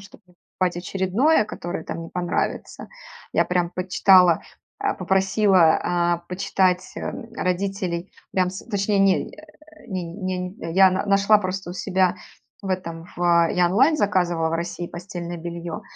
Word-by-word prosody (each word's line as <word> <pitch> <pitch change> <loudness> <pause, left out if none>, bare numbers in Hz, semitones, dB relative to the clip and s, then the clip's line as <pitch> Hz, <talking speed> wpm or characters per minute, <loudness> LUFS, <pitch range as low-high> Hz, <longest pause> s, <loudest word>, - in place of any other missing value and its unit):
чтоб 200 - -15
не 180 - -25 0.2
покупать 180 -2 +1
очередное, 195 - +1
которое, 175 -5 -6
там, 165 - -5
не 165 - -8
понравится. 175 -1 -3 0.4
Я - - +3
прям 180 -1 0
почитала, 185 -1 +4 0.4
э, 405 - +1
попросила, 190 -2 +3
а, 175 -1 +1
почитать, 185 -1 0
э, - - -3 0.3
родителей, 185 -1 -2 0.2
прям 185 -1 +1
с 190 - -9
точнее 205 -2 0
не, 195 -1 +3
э, 310 -2 -18
не 185 -4 -4
не 185 +2 -4
не 165 -4 -7
я 190 0 +7
на 185 +2 -2
нашла 200 +1 +4
просто 190 -2 -4
у - - -6
себя 185 -1 +1 0.5
в 195 - -6
этом, 170 -3 -4
в, 170 -1 +3
я 180 -1 +3
онлайн 265 - +4
заказывала 175 - +1
в - - -1
России 170 +1 -4
постельное 175 -1 -7
бельё, 170 0 -6
185 Hz, 155 wpm, -23 LUFS, 175-195 Hz, 0.5 s, я